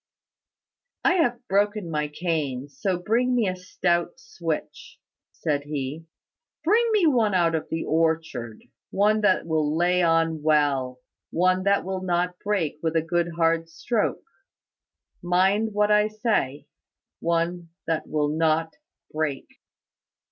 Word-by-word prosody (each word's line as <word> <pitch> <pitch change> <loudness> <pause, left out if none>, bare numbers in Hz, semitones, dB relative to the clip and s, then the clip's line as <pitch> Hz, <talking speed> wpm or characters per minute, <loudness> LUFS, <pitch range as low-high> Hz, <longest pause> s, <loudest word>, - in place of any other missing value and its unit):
"I - - +4
have 245 -6 0
broken 205 -2 0
my 150 -1 -1
cane; 150 -4 -3
so 175 +7 -2
bring 235 +7 +1
me 230 -4 +2
a 185 - -1
stout 175 -1 -1
switch," 165 -3 -5 0.3
said 145 -2 -1
he. 145 +2 -5 0.6
"Bring 450 +8 +3
me 420 -5 +3
one 230 -9 +3
out 170 -2 +3
of 160 - -2
the 160 - -2
orchard; 160 -8 -1 0.3
one 215 +2 +2
that 205 -3 +2
will 155 -1 0
lay 180 +1 +2
on 165 -2 +2
well 140 -5 +1 0.3
one 185 +2 +2
that 200 -1 +2
will 190 0 -3
not 180 0 -1
break 190 -8 -1
with 160 0 -1
a 160 - +2
good 170 +1 -1
hard 165 0 +1
stroke; 215 +6 -1 1.0
mind 190 +5 +2
what 210 0 +2
I 210 0 +4
say 215 - -1 0.5
one 170 +1 -1 0.2
that 160 -1 -2
will 150 -1 0
not 160 +1 +1 0.4
break." 155 -3 -2
170 Hz, 135 wpm, -25 LUFS, 155-200 Hz, 1.0 s, I